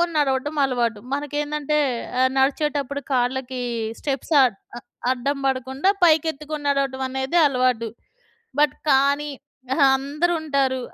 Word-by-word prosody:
పట్టుకోని 345 -1 -1
నడవడం 285 +1 0
అలవాటు. 240 -5 0 0.2
మనకేందంటే 295 +1 -2 0.4
ఆహ్, 260 0 +4
నడిచేటప్పుడు 280 0 0
కాళ్ళకి 255 0 -1 0.4
స్టెప్స్ 275 +2 -3
అ - - +8 0.4
ఆహ్, - - -16 0.3
అడ్డం 275 +3 -2
బడకుండా 265 +6 0
పైకెత్తుకొని 310 -2 +1
నడవడం 275 -1 -1
అనేది 265 +5 0
అలవాటు. 250 -4 +1 0.7
బట్ 300 - +3 0.2
కానీ, 280 +2 +3 0.5
ఆహా, 275 -2 +5
అందరూ 300 +6 -1
ఉంటారు. 270 -4 0
275 Hz, 115 wpm, -23 LUFS, 260-295 Hz, 0.7 s, అ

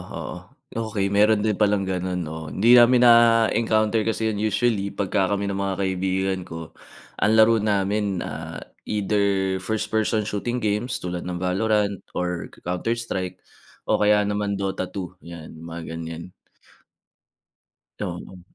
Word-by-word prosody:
oo. - - -5 0.4
Okey, 110 -3 -1
meron 105 +1 +5
din 105 -3 0
palang 105 -1 +3
gano'n 90 -1 -2
'no? 80 - -7 0.2
Hindi 120 +5 +6
namin 120 +1 +6
na-encounter 115 -2 +4
kasi 110 0 0
yun 105 - -4
usually 110 -1 +1
pagka 95 -1 0
kami 100 0 -1
ng 100 - -2
mga 95 -1 -1
kaibigan 95 0 0
ko. 80 -1 -8 0.5
Ang 105 - +3
laro 110 +1 +6
namin, 100 -2 0
ah, - - -6 0.3
either 100 -2 +1
first 110 +3 -3
person 110 0 +1
shooting 105 +4 -3
games 110 +5 -1
tulad 90 -1 -4
ng 90 -1 -4
Valorant, 100 +1 +1 0.2
or 90 -1 -2 0.2
Counter 90 +6 -1
Strike, 95 -6 -4 0.5
o - - +3
kaya 105 0 +4
naman 105 0 -1
Dota 95 -1 -2
2, 90 -2 -7
yan, 85 -2 -9
mga 85 +1 -7 0.2
ganyan. 80 0 -6 1.7
Oo. 95 -1 -6
100 Hz, 140 wpm, -24 LUFS, 95-110 Hz, 1.7 s, Hindi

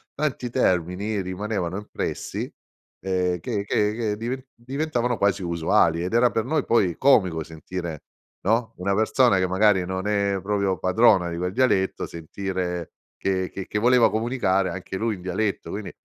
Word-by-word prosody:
tanti 135 -5 -2
termini 95 -1 0
rimanevano 95 -1 -3
impressi, 105 - -4 0.5
ehm, 90 -2 0
che 105 -2 -2
che 105 +1 +1
che 110 -3 -1
diven 125 +4 -4
diventavano 125 -1 -2
quasi 100 0 +1
usuali 85 0 +2
ed 90 - -4
era 120 +1 +4
per 110 +1 -1
noi 150 +1 0
poi 95 -7 +2
comico 95 - +3
sentire, 80 0 -6 0.4
no, 115 +2 +1
una 100 +2 0
persona 110 0 +3
che 95 - +2
magari 95 -1 +3
non 95 +2 -3
è 100 -2 +1
proprio 100 -1 0
padrona 95 -1 +4
di 85 - -4
quel 90 +1 -2
dialetto 100 -6 +1
sentire 90 +1 -4 0.3
che 95 -1 0
che 95 - -6
che 105 - -1
voleva 120 +1 +5
comunicare 110 -5 +1
anche 95 +2 -5
lui 110 0 -1
in 90 - -12
dialetto. 95 0 -2
Quindi, 100 0 -5
100 Hz, 155 wpm, -24 LUFS, 90-115 Hz, 0.5 s, voleva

